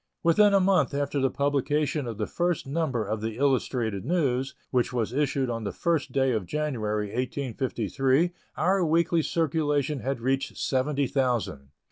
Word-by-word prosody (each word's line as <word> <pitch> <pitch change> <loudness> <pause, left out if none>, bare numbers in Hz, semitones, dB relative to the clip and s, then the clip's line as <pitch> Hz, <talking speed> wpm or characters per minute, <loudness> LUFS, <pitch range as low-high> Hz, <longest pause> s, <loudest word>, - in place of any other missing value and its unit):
Within 205 +5 +5
a - - +6
month 185 -8 +2
after 145 0 -1
the 135 0 +2
publication 145 +1 0
of 115 -3 -5
the 105 - -1
first 175 +4 -1
number 135 -6 -1
of 105 +1 -3
the 110 0 -4
Illustrated 125 -7 0
News, 135 -4 0 0.2
which 125 -2 +1
was 120 -2 -1
issued 140 -1 0
on 115 -2 -3
the 100 - -2
first 165 -4 -1
day 135 -1 +2
of 110 -6 -2
January, 110 -8 -2
1853, 130 - 0 0.3
our 190 0 +2
weekly 165 +1 +2
circulation 150 -3 0
had 135 0 -2
reached 135 +3 -1
seventy 140 +2 0
thousand. 120 - -1
135 Hz, 155 wpm, -27 LUFS, 120-150 Hz, 0.3 s, a